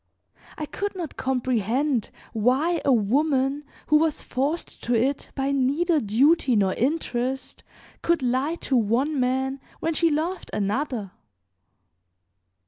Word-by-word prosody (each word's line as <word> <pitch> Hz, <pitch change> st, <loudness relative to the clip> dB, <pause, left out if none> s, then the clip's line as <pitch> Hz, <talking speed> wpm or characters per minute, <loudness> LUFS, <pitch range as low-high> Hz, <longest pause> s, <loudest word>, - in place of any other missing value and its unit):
I 305 Hz, -, -3 dB
could 405 Hz, +6 st, -4 dB
not 340 Hz, -6 st, -5 dB
comprehend 255 Hz, 0 st, 0 dB, 0.2 s
why 265 Hz, +10 st, +2 dB
a 275 Hz, -, +3 dB
woman 270 Hz, +5 st, +2 dB, 0.2 s
who 305 Hz, 0 st, +4 dB
was 320 Hz, -1 st, 0 dB
forced 285 Hz, +6 st, -2 dB
to 240 Hz, -, +1 dB
it 265 Hz, +5 st, 0 dB
by 270 Hz, 0 st, 0 dB
neither 290 Hz, +5 st, +2 dB
duty 255 Hz, +5 st, +3 dB
nor 195 Hz, -3 st, +2 dB
interest 260 Hz, -2 st, -2 dB, 0.4 s
could 340 Hz, -5 st, +1 dB
lie 260 Hz, +6 st, +1 dB
to 270 Hz, -, +1 dB
one 250 Hz, +6 st, +1 dB
man 265 Hz, +2 st, 0 dB, 0.2 s
when 330 Hz, -, -1 dB
she 335 Hz, +1 st, +3 dB
loved 320 Hz, +5 st, -2 dB
another. 210 Hz, 0 st, -2 dB
270 Hz, 125 wpm, -25 LUFS, 245-305 Hz, 0.4 s, who